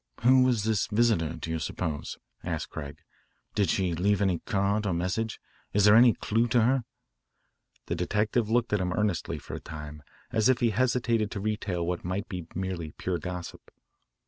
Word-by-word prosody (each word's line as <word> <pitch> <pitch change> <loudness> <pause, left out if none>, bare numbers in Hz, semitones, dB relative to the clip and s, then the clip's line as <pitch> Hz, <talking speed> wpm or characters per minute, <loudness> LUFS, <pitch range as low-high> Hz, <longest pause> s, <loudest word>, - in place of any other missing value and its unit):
"Who 130 +2 +6
was 125 -5 +3
this 110 -2 +1
visitor, 105 -8 +2
do 80 - -5
you 80 - -1
suppose?" 80 -1 -4 0.3
asked - - -3
Craig. 70 -2 -7 0.6
"Did 100 -5 +1
she 90 0 +1
leave 100 +5 +2
any 95 -4 +1
card 100 +2 0
or 95 - +1
message? 95 +6 -2 0.3
Is 105 0 +4
there 105 0 +8
any 120 0 +7
clue 115 +4 0
to 120 0 +3
her?" 125 0 +2 1.0
The - - -2
detective 105 +5 0
looked 120 -1 +1
at 105 - +3
him 90 0 -1
earnestly 105 -4 -1
for - - -9
a - - -4
time 75 -1 -8 0.3
as 110 +2 +3
if 130 -1 +3
he 120 -2 +2
hesitated 120 -2 +1
to 100 - -5
retail 100 -4 -2
what 90 0 -2
might 95 +5 -3
be 90 -5 -6
merely 90 -4 -3
pure 90 -2 -2
gossip. 90 -1 -7
100 Hz, 180 wpm, -28 LUFS, 90-115 Hz, 1.0 s, there